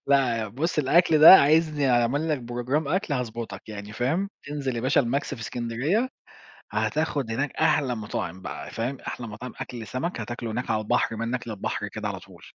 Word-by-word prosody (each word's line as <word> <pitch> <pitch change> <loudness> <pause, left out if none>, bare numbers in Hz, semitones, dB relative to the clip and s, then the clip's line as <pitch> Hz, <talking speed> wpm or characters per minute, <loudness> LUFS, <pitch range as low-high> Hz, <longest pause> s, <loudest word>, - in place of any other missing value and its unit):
لأ، 120 -6 +2
بُص 155 - -2
الأكل 155 +3 +4
ده 155 +5 +12
عايزني 150 -2 +3
أعمل 125 +6 +2
لك 155 -3 +1
program 120 +5 -2
أكل 180 -2 0
هاضبطك 115 -5 -5
يعني، 105 -1 -7
فاهم؟ 160 - 0 0.2
انزل 135 -4 -2
يا - - -1
باشا 130 +3 +3
الماكس 135 +3 -1
في 115 - -11
إسكندرية، 125 - -1 0.6
هتاخد 145 -6 -1
هناك 135 +5 -1
أحلى 150 -5 +2
مطاعم 95 -4 -5
بقى، 95 - -6
فاهم؟ 125 +4 -3
أحلى 120 - -6
مطاعم 115 +3 -8
أكل 120 -3 -6
سمك 130 - -3
هتاكله 120 +1 -5
هناك 120 +3 -3
على 110 -1 +1
البحر، 115 +1 +1
منك 120 +2 -3
للبحر 105 -3 -3
كده - - -5
على - - -4
طول. - - -16
125 Hz, 175 wpm, -26 LUFS, 115-150 Hz, 0.6 s, ده